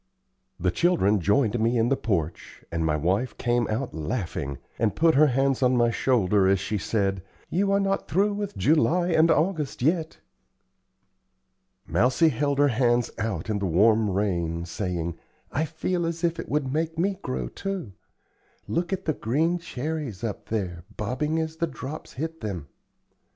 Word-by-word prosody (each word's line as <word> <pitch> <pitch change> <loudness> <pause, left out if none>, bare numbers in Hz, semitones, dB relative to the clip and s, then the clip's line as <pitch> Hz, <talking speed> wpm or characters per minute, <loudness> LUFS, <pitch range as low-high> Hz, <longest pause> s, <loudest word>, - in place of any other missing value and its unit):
The 90 +1 +1
children 105 - +3
joined 110 +5 +2
me 115 +2 +2
in 115 +1 +2
the 135 - +3
porch, 85 - -3
and 85 -1 -1
my 80 -1 +1
wife 95 - 0
came 120 -1 +1
out 120 +4 -2
laughing, 80 - -3 0.2
and 110 -2 +1
put 165 0 +4
her 155 +2 +6
hand 135 0 +1
on 125 -1 +3
my 120 -1 +3
shoulder 105 -6 +2
as 95 0 +3
she 100 +2 -2
said, 100 -2 0 0.3
"You 195 +3 +1
are 200 - +3
not 195 0 0
through 205 +3 +2
with 205 0 -4
July 165 +3 +3
and 165 -1 +4
August 155 -6 +1
yet." 160 +2 +1 1.7
Mousie 130 +7 +3
held 140 +1 0
her 145 0 +4
hands 120 -1 +2
out 110 -1 -2
in 105 -2 -1
the 100 - -1
warm 105 +5 +4
rain, 85 -4 -1
saying: 85 -2 -3 0.3
"I 155 +4 0
feel 165 +2 -2
as 165 +1 -4
if 170 -1 +1
it - - -6
would 140 -2 0
make 160 +1 -1
me 190 +3 0
grow, 65 -1 -3
too. 190 - -5 0.8
Look 170 +1 -1
at 190 0 -2
the 155 - +1
green 160 +9 0
cherries 145 - -4
up 110 -3 -4
there, 90 -6 -3
bobbing 130 +9 -1
as 160 0 -2
the 170 - 0
drops 150 -1 -7
hit 160 +4 -5
them." 90 -10 -5
125 Hz, 165 wpm, -26 LUFS, 100-160 Hz, 1.7 s, her